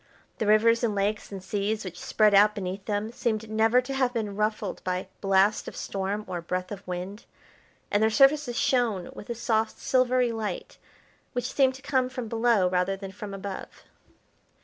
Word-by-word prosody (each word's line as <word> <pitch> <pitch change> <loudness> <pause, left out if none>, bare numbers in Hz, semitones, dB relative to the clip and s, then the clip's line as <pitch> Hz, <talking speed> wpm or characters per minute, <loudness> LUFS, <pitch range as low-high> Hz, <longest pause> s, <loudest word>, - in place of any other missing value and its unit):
The 220 - 0
rivers 230 +3 +4
and 220 -3 +1
lakes 205 +2 -1
and 195 -2 -7
seas 205 +2 -2
which 180 -1 -7
spread 215 -1 +3
out 210 +1 +6
beneath 195 0 -5
them, 210 +1 -2
seemed 220 -2 -2
never 225 +3 +4
to 270 +2 -6
have 260 -2 +1
been 210 -3 -2
ruffled 215 -2 -2
by 185 0 -2
blast 195 +1 +3
of - - -7
storm 200 +2 -3
or 180 -2 -4
breath 180 +2 -3
of 200 -2 -6
wind, 185 +4 -5 0.7
and 205 - +2
their 220 - +4
surfaces 270 +2 +4
shone 230 -8 +1
with 205 - -11
a 235 - -2
soft, 225 -1 0
silvery 255 -1 +2
light, 220 -2 -5 0.5
which 245 +1 -3
seemed 265 -2 +3
to 265 - -13
come 260 -2 +1
from 255 -3 -5
below 225 -4 +2
rather 180 +2 0
than 195 -1 -7
from 205 +1 -8
above. 195 0 -7
215 Hz, 180 wpm, -27 LUFS, 195-235 Hz, 0.7 s, out